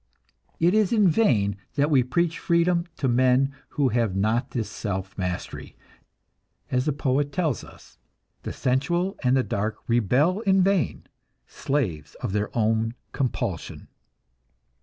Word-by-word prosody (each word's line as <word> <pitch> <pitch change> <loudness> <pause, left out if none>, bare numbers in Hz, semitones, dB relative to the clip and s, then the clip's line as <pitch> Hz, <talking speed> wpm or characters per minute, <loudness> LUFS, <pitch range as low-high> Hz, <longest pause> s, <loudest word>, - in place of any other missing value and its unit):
It 175 +3 +3
is 215 -3 +3
in 210 -4 +4
vain 110 - +2 0.2
that 145 +2 +2
we 135 -3 +5
preach 165 +6 0
freedom 170 -1 +2
to 135 - 0
men 130 +2 +3 0.2
who 140 -3 +3
have 115 -4 0
not 110 +6 +1
this 120 -4 -3
self 95 -3 -4
mastery; 90 -1 -5 1.0
as 125 +1 +1
the 155 - +2
poet 140 0 0
tell 160 +1 +1
us: 120 - -11 0.4
"The - - -5
sensual 170 +9 0
and 130 +1 +3
the 130 - +2
dark 105 0 -2
rebel 125 - +2
in 195 -3 +3
vain, 190 - 0 0.4
slaves 115 - -3
of - - -4
their 105 0 0
own 115 +1 +1 0.2
compulsion." 115 - -3
130 Hz, 140 wpm, -25 LUFS, 110-170 Hz, 1.0 s, we